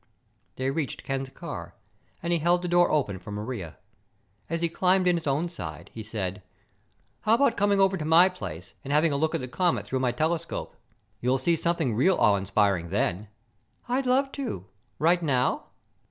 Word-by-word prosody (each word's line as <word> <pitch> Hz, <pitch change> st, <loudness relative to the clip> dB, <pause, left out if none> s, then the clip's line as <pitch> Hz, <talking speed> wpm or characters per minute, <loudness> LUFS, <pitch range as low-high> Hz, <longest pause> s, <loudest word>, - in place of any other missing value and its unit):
They 130 Hz, +1 st, -1 dB
reached 145 Hz, -2 st, -3 dB
Ken's 135 Hz, 0 st, -3 dB
car, -, -, -8 dB, 0.5 s
and 170 Hz, 0 st, 0 dB
he 170 Hz, -, +2 dB
held 175 Hz, +3 st, +2 dB
the -, -, -1 dB
door 175 Hz, 0 st, +4 dB
open 115 Hz, -11 st, 0 dB
for 90 Hz, -, -11 dB
Maria. 105 Hz, -5 st, -5 dB, 0.7 s
As 165 Hz, +1 st, -2 dB
he 170 Hz, -, +2 dB
climbed 185 Hz, +2 st, +2 dB
in 180 Hz, -, +4 dB
his 165 Hz, -3 st, -4 dB
own 145 Hz, +5 st, +1 dB
side 85 Hz, -, -8 dB
he 115 Hz, -, -6 dB
said, 105 Hz, -3 st, -4 dB, 0.8 s
"How 220 Hz, +1 st, +3 dB
about 255 Hz, -2 st, +3 dB
coming 205 Hz, -1 st, +2 dB
over 195 Hz, 0 st, +4 dB
to 160 Hz, -, -4 dB
my 165 Hz, +4 st, +6 dB
place 95 Hz, -, -7 dB
and 135 Hz, -, -5 dB
having 155 Hz, +2 st, +3 dB
a -, -, 0 dB
look 155 Hz, +3 st, +1 dB
at -, -, -1 dB
the 125 Hz, -, -4 dB
comet 175 Hz, +7 st, 0 dB
through 130 Hz, -, -2 dB
my 125 Hz, -1 st, +1 dB
telescope? 160 Hz, +5 st, -2 dB, 0.4 s
You'll 125 Hz, +2 st, +2 dB
see 165 Hz, +6 st, +2 dB
something 165 Hz, -6 st, 0 dB
really 175 Hz, -, +3 dB
awe 105 Hz, -3 st, +5 dB
inspiring 100 Hz, -3 st, +1 dB
then." 100 Hz, +1 st, -1 dB, 0.6 s
"I'd 255 Hz, +2 st, 0 dB
love 270 Hz, +2 st, +3 dB
to. 250 Hz, -, -4 dB, 0.3 s
Right 170 Hz, +3 st, +3 dB
now?" 130 Hz, -6 st, +1 dB
150 Hz, 185 wpm, -27 LUFS, 110-175 Hz, 0.8 s, my